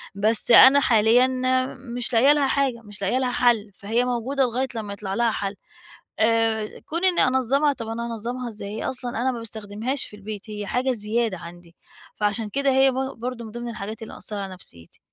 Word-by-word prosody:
بس 215 +4 +3
أنا 270 +4 +9
حاليًا 245 +2 +3
آآ، 255 0 +2 0.3
مش 245 +1 -3
لاقية 255 +5 +6
لها 290 -2 +2
حاجة، 265 -3 0
مش 210 -1 -11
لاقية 200 +6 +1
لها 255 -1 0
حلّ، 230 -4 +2
فهي 225 +6 -1
موجودة 250 +3 0
لغاية 255 +2 0
لمّا 210 -3 -4
يطلع 200 -1 -5
لها 235 +1 +2
حل 200 -1 -3 0.6
آآ، 220 -1 +2 0.2
كون 335 +4 -2
إني 360 -6 +3
أنظّمها 265 +3 +2
طَب 230 -4 -7
أنا 230 +1 -4
هانظّمها 240 +2 -4
إزاي؟ 205 -2 -7
هي - - -4
أصلًا 250 -1 -4
أنا 260 +1 +1
ما 240 - -5
باستخدمهاش 225 +4 -4
في - - -12
البيت 210 +1 -8
هي 210 -1 -5
حاجة 255 +1 0
زيادة 220 -2 -1
عندي، 170 0 -12 0.4
فعشان 210 +1 -1
كده 280 +4 0
هي 265 0 +4
ب - - -6 0.2
برضه 240 0 -5
من 220 - -9
ضمن 240 +1 -6
الحاجات 215 0 -6
اللي 225 - -8
مأثّرة 210 -1 -5
على 190 -1 -6
نفسيتي. 85 - -8
230 Hz, 200 wpm, -24 LUFS, 210-255 Hz, 0.6 s, أنا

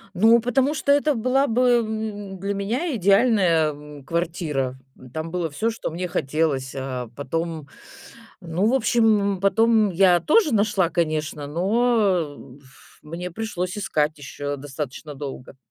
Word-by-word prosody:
Ну, 225 +5 +6
потому 255 +5 +1
что 280 -1 +2
это 290 +1 +2
была 255 +3 +1
бы, 245 -2 0 0.2
м, 210 -3 -5
для 200 +2 -2
меня 240 - -2
идеальная, 195 -6 +3
эм, 145 0 -12
квартира. 155 -6 -2 0.3
Там 160 +1 -4
было 170 -1 -2
всё, 215 +10 -1
что 230 - -4
мне 180 +3 -3
хотелось. 145 -5 -1
А 130 -3 -5
потом, 160 +2 -4 0.7
ну, 175 +2 -1
в 235 - +2
общем, 220 -6 +3
м, 190 - -6
потом 220 +2 +3
я 180 -1 +4
тоже 310 - +3
нашла, 205 -4 +2
конечно, 155 -3 -2
но, 220 +10 +1 0.3
э, - - -13
б 130 +3 -14
ф 135 0 -21
мне 170 +4 -6
пришлось 185 -1 -4
искать 155 -6 0
ещё 145 0 -5
достаточно 145 +1 -7
долго. 135 -2 -8
180 Hz, 150 wpm, -23 LUFS, 150-220 Hz, 0.7 s, Ну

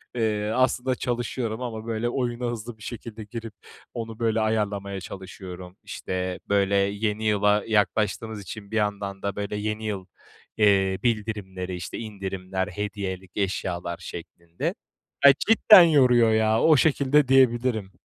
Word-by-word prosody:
eee, 105 -2 0
aslında 130 0 +1
çalışıyorum 120 -1 -3
ama, 110 -2 -5
böyle, 115 +1 -1
oyuna 120 -1 -2
hızlı 115 0 -7
bir 110 - -14
şekilde 115 -1 -7
girip 115 +1 -8 0.4
onu, 115 -1 -6
böyle, 115 -1 +1
ayarlamaya 100 -3 -1
çalışıyorum. 95 -1 -9
İşte, 90 -1 -4
böyle, 100 0 +2
yeni 105 +2 0
yıla 105 0 +3
yaklaştığımız 110 0 0
için 100 +3 -9
bir - - -4
yandan 100 -2 -2
da, 100 -1 -3
böyle, 105 0 -4
yeni 105 +1 -3
yıl, 100 -3 -3 0.5
eee, 95 -3 +3
bildirimleri 100 -5 -2
işte 85 -2 -6
indirimler, 95 -3 -4
hediyelik 100 -3 -5
eşyalar 90 -3 -2
şeklinde. 85 0 -6 0.5
Ay, 140 - +10
cidden 215 -4 +8
yoruyor 125 -8 +5
ya, 110 0 +2
o 155 -3 +6
şekilde 145 -1 +3
diyebilirim. 120 -6 +3
105 Hz, 135 wpm, -25 LUFS, 100-115 Hz, 0.5 s, Ay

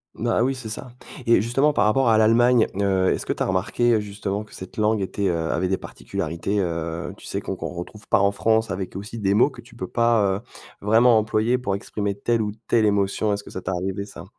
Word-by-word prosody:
Bah, 115 0 0
ah - - +4
oui, 135 +2 +1
c'est 125 -4 -7
ça. 110 +3 -6 0.4
Et 115 - +6
justement 125 +8 +2
par - - +2
rapport 120 +3 +3
à 110 - +5
l'Allemagne, 115 +2 +5 0.2
heu, 95 -2 +2
est-ce - - -5
que - - 0
tu - - -2
as - - -1
remarqué, 95 +6 +1
heu, 110 - +3
justement 105 0 -4
que 105 - -15
cette 95 - -10
langue 105 0 +2
était, 100 +1 -1
heu 90 - +1 0.2
avait 95 - 0
des 95 +1 0
particularités, 85 +6 -4
heu, 85 -2 -3
tu - - -13
sais, - - -3
qu'on - - -4
qu'on - - -5
retrouve 90 +4 -9
pas - - +3
en 100 0 +3
France, 110 +1 +1
avec 95 -1 -4
aussi 105 +4 -6
des 100 -1 +1
mots 125 +7 +4
que - - -12
tu 120 - -18
peux 95 - -5
pas, 115 -5 +2
heu, - - -10 0.4
vraiment 115 +3 +5
employer 110 +3 +1
pour 100 -6 -1
exprimer 100 0 -3
telle 115 +3 0
ou 105 -1 -1 0.2
telle 115 -2 +3
émotion, 100 +1 +1
est-ce 100 0 -4
que - - -12
ça 95 - -6
t'a 95 - -3
arrivé 95 +2 -3
ça? 90 -4 -11
105 Hz, 245 wpm, -23 LUFS, 95-115 Hz, 0.4 s, Et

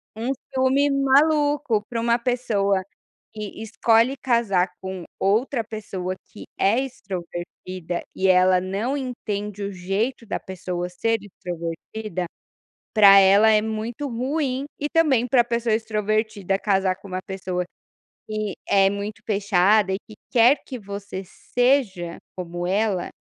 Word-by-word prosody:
um 235 +4 -2 0.2
ciúme 265 +2 +3
maluco 280 -3 +3
pra 235 -1 -2
uma 235 0 +3
pessoa 205 -6 0 0.5
que 215 0 -7
escolhe 230 +3 +3
casar 215 -8 +2
com 190 -2 -5 0.2
outra 230 +5 +1
pessoa 190 -4 -5 0.2
que - - -10
é 210 +6 +3
extrovertida 185 -6 -5
e 190 - +1
ela 185 0 +5
não 200 +9 -2
entende 210 -6 -4
o 200 - -3
jeito 195 +7 -2
da 210 - -3
pessoa 180 -1 -5
ser 225 +5 0
extrovertida, 180 +1 -5 0.7
pra 200 -2 +8
ela 200 +3 +6
é 215 -1 +4
muito 220 +5 -3
ruim 265 +2 -1
e 295 - -2
também 275 -7 +3
pra 240 -1 +4
pessoa 235 -2 0
extrovertida 215 -2 -1
casar 190 -3 +1
com 200 0 -13
uma 185 0 -4
pessoa 185 -2 -3 0.6
que 215 -3 -3
é 195 -1 +5
muito 200 +1 -5
fechada 200 -1 +3
e - - 0
que 215 - -12 0.2
quer 250 +4 +5
que 255 - -6
você 200 -2 -7
seja 210 -5 0 0.2
como 175 -1 -4
ela, 195 -2 0
210 Hz, 130 wpm, -23 LUFS, 190-235 Hz, 0.7 s, pra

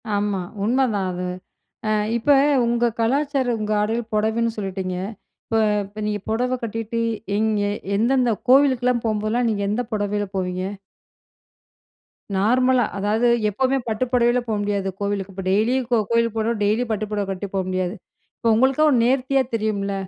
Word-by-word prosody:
ஆமா, 205 -2 0 0.2
உண்மதான் 225 -5 +1
அது. 180 0 -4 0.6
அ - - +1 0.3
இப்ப 235 - -4 0.4
உங்க 235 0 +2
கலாச்சாரம், 265 0 +1
உங்க 215 0 -3
ஆடைல 225 +3 0
பொடவைன்னு 220 +2 +1
சொல்லிட்டீங்க. 190 -2 -3 0.5
இப்ப 225 - +1 0.3
இப்ப 205 +2 -11
நீங்க 210 -2 -2
பொடவ 250 +3 0
கட்டிட்டு, 225 +1 -3 0.4
எங்கே 210 -2 +1 0.3
எந்தெந்த 245 +2 +2 0.2
கோவிலுக்குலாம் 255 -3 +4
போம்போதெல்லாம் 220 +2 0
நீங்க 200 -2 -1
எந்த 215 +4 0
பொடவைல 205 0 -1
போவீங்க? 185 0 -2 1.7
நார்மலா. 250 +5 +3
அதாவது, 210 +4 +1 0.2
எப்பவுமே 260 +6 +1
பட்டு 220 +3 0
பொடவைல 240 0 +3
போக 220 - 0
முடியாது 200 -1 -1
கோவிலுக்கு. 200 -1 -2
இப்ப 190 +1 -6
டெய்லியும் 235 +5 +1
கோ 240 - +4
கோயிலுக்கு 230 -1 +1
போகணும்ன்னா, 220 0 -1
டெய்லியும் 225 +3 +1
பட்டு 215 0 -1
பொடவ 205 -1 -1
கட்டிட்டு 195 +1 -5
போகமுடியாது. 185 0 -1 0.4
இப்ப 230 - +2
உங்களுக்கா 265 +6 +3
ஒரு 255 - +4
நேர்த்தியா 265 +2 +2
தெரியும்ல்ல. 210 -3 -1
220 Hz, 140 wpm, -22 LUFS, 205-245 Hz, 1.7 s, கோவிலுக்குலாம்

